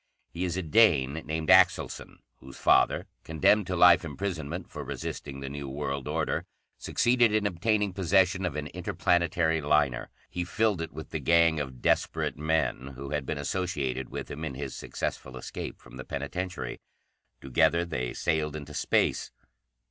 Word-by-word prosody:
He 90 +2 -3
is 90 0 -2
a 95 - -1
Dane 80 - +4
named 80 0 -2
Axelson, - - +3 0.2
whose 65 +1 -12
father, - - +3 0.2
condemned 85 +6 +3
to 90 - -1
life 90 0 +7
imprisonment 85 +1 -4
for 75 - -6
resisting 70 0 -6
the 70 - -5
new 70 -1 -6
world 70 -1 -3
order, - - -1 0.3
succeeded 120 -2 +3
in 105 -1 +1
obtaining 100 +2 +1
possession 95 0 +2
of 90 -6 -2
an 75 -1 -3
interplanetary 85 0 +1
liner. 75 -4 +1 0.2
"He 90 - -3
filled 100 +1 0
it 80 - -4
with 80 +2 -9
the 80 - -2
gang 85 +2 +4
of 65 -4 -6
desperate - - +1
men 75 -3 -1
who 70 +2 -7
had 75 -3 -2
been 80 - -2
associated 70 -5 -2
with - - -6
him 75 +3 -6
in 70 -5 -4
his 70 -1 -5
successful 65 -1 -5
escape 65 - -6
from - - -14
the 65 - -6
penitentiary. 90 +8 -4 0.6
Together 85 +6 +2
they 65 -8 -3
sailed 75 -1 -1
into 75 -2 -7
Space. - - +1
80 Hz, 160 wpm, -28 LUFS, 70-90 Hz, 0.6 s, life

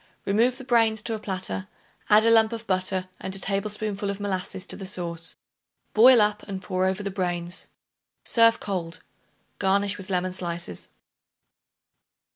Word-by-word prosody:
Remove 235 +6 +2
the 265 - -8
brains 225 -4 +2
to 230 - -3
a 220 - -3
platter; 140 - -4 0.4
add 215 +1 +6
a 230 - +5
lump 225 -1 +5
of 230 0 -6
butter 185 -1 -1
and 190 - -4
a - - 0
tablespoonful 205 +1 -2
of 200 0 -4
molasses 190 -1 -3
to - - -1
the 195 - -7
sauce; 170 -3 -4 0.6
boil 245 +3 +8
up 210 0 +1
and 195 -2 -4
pour 185 0 0
over 190 +2 -1
the 200 - -3
brains. 175 -2 -3 0.6
Serve 230 -1 +4
cold; 180 -4 -4 0.6
garnish 200 +1 +1
with 190 +1 -9
lemon 185 0 0
slices. 170 - -4
195 Hz, 155 wpm, -25 LUFS, 185-215 Hz, 0.6 s, boil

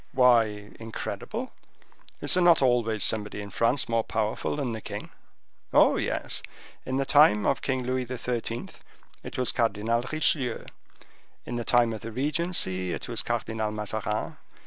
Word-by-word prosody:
"Why 115 -5 +3
incredible? 115 0 -5 0.7
Is - - +1
there 180 - +3
not 170 -5 +6
always 115 -4 +2
somebody 105 -1 0
in 100 -1 -7
France 115 +7 +1
more 115 -1 +1
powerful 110 +3 -1
than 140 -5 -2
the 110 -1 -5
king?" - - -7 0.6
"Oh, - - +5
yes; - - -1 0.5
in 130 - -1
the 135 - +1
time 140 -7 +5
of 135 - +1
King 130 -2 -1
Louis 130 0 -1
XIII. 120 -1 -3 0.5
it - - -7
was 125 -1 +1
Cardinal 115 +1 +1
Richelieu; 140 -6 +1 0.8
in 120 - -4
the 120 - -2
time 120 -1 +3
of 110 - -6
the 115 - -6
regency 130 - 0
it - - -5
was - - -3
Cardinal 110 -1 -2
Mazarin. 105 0 -3
115 Hz, 150 wpm, -27 LUFS, 110-130 Hz, 0.8 s, not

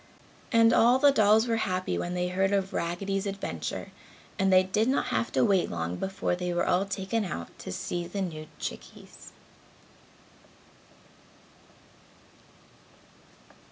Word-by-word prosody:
And 230 -2 +5
all 240 +3 +5
the 285 +2 +5
dolls 220 -1 +4
were 230 -1 +1
happy 185 -4 -1
when 175 +1 -3
they 180 0 -1
heard 190 +2 +1
of 195 -1 0
Raggedy's 195 +4 -2
adventure 140 - -5 0.5
and 195 0 +3
they 185 0 +6
did 210 +4 0
not 265 - +1
have 115 0 -1
to 130 -2 +3
wait 190 -3 +2
long 85 +1 -3
before 190 -2 -2
they 180 0 -3
were - - +1
all 185 +2 +2
taken 195 +3 -2
out 85 - -5
to - - -7
see 175 - -4
the 195 +3 -5
new 155 -4 -6
chickies. - - -9
190 Hz, 135 wpm, -28 LUFS, 175-205 Hz, 0.5 s, they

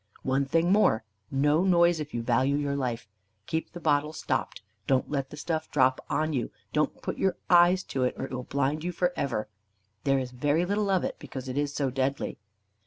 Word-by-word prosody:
One 135 +1 +1
thing 165 +5 +2
more: 195 - +4 0.3
No 145 +5 +2
noise, 175 -3 +4
if 150 -1 -5
you 120 - -3
value 130 +4 +2
your 145 -1 -1
life. 120 -5 -2 0.4
Keep 160 +7 -3
the 175 - -7
bottle 150 -1 +1
stopped. - - -2 0.2
Don't 130 +1 +1
let 135 -2 -1
the 150 - -10
stuff 160 0 -2
drop 130 -2 +2
on 155 0 0
you; 125 -4 -1 0.2
don't 150 0 0
put - - -4
your 190 -2 +1
eyes 175 +1 +6
to 130 -2 +1
it, 125 - -1
or - - -3
it - - -10
will 125 -1 -3
blind 140 +4 -1
you 180 - -1
for 180 +1 0
ever. 120 -6 -2 0.6
There 135 -1 +3
is 130 -2 -3
very 145 +7 +1
little 205 +2 0
of 190 -2 +2
it, - - -3
because 130 -1 -7
it 130 - -4
is 145 0 0
so 135 -3 0
deadly." 135 +2 -2
145 Hz, 210 wpm, -28 LUFS, 130-165 Hz, 0.6 s, eyes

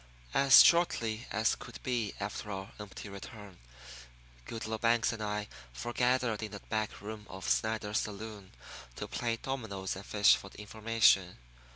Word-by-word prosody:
As 135 -1 +9
shortly 120 -9 +2
as 110 +2 +2
could 120 - -9
be 120 -5 -1
after 105 +1 -4
our 95 0 -6
empty 105 0 -8
return 100 -1 -10 0.9
Goodloe 110 -1 -4
Banks 115 0 +2
and 110 - -7
I 105 0 -2 0.3
forgathered 120 - 0
in 110 -1 -5
the 105 - -6
back 110 0 -3
room 105 0 -8
of 95 0 -7
Snyder's 110 -1 +1
saloon 105 -2 -7 0.4
to - - -5
play 115 -1 -1
dominoes 110 -8 -4
and 95 - -8
fish 105 0 +5
for 100 - -9
information. 105 -3 +2
110 Hz, 145 wpm, -32 LUFS, 100-115 Hz, 0.9 s, As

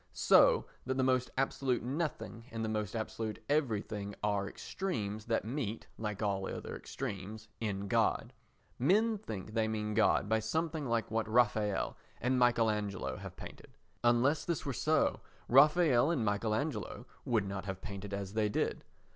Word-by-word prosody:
So - - +5 0.2
that 130 +1 -2
the 130 - +2
most 130 -1 +2
absolute 130 -2 0
nothing 130 -4 -3
and 115 0 -3
the - - -2
most 105 -1 -2
absolute 110 -1 -3
everything 105 -8 -1
are 100 -1 0
extremes 110 - -4
that 115 -3 0
meet 115 -3 -3
(like 105 -1 -3
all 95 -2 0
other - - -5
extremes) 110 -3 -6
in 100 -3 -2
God. 115 +2 +1 0.5
Men 210 - +3
think 110 - -6
they 110 -1 +2
mean 105 -1 -2
by - - -4
God 110 +1 +3
something 160 +4 -1
like 115 -2 0
what 110 0 0
Raffaelle 110 -4 +2 0.2
and 125 +2 +1
Michael 120 -2 +4
Angelo 105 -2 -3
have - - -9
painted; - - -11 0.3
unless 120 +5 +3
this 170 -2 -2
were 140 - -1
so 155 +4 +2 0.3
Raffaelle 145 0 +6
and 140 -10 +1
Michael 105 +1 +1
Angelo 145 -1 -3 0.2
would 115 -6 +1
not 95 0 -4
have 95 -2 -4
painted 100 0 -6
as 100 -1 -4
they 110 -1 +1
did. - - -1
115 Hz, 160 wpm, -33 LUFS, 105-130 Hz, 0.5 s, Raffaelle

